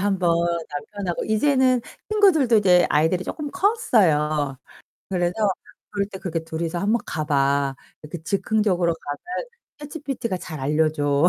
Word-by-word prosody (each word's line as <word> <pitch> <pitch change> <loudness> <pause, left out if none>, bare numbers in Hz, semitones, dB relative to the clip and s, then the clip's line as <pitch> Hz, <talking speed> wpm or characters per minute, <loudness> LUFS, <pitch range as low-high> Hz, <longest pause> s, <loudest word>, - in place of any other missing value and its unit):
한번 190 -3 +1 0.4
남편하고 175 +5 -4
이제는 255 +3 +3 0.3
친구들도 335 - +4
이제 180 -4 +5
아이들이 160 +5 +2
쪼끔 295 -2 -5
컸어요. 155 - +2 0.5
그래서 175 -2 0 0.6
"그럴 200 -1 -1
때 195 -2 -8
그렇게 165 -3 -3
둘이서 165 +1 -3
한번 210 +6 +1
가봐. 140 -2 0 0.3
이렇게 155 +2 -7
즉흥적으로 190 -2 +1
가면 165 - -6 0.3
ChatGPT가 280 - -4
잘 160 -4 -8
알려줘." 150 +1 +2
180 Hz, 330 characters per minute, -23 LUFS, 155-225 Hz, 0.6 s, 이제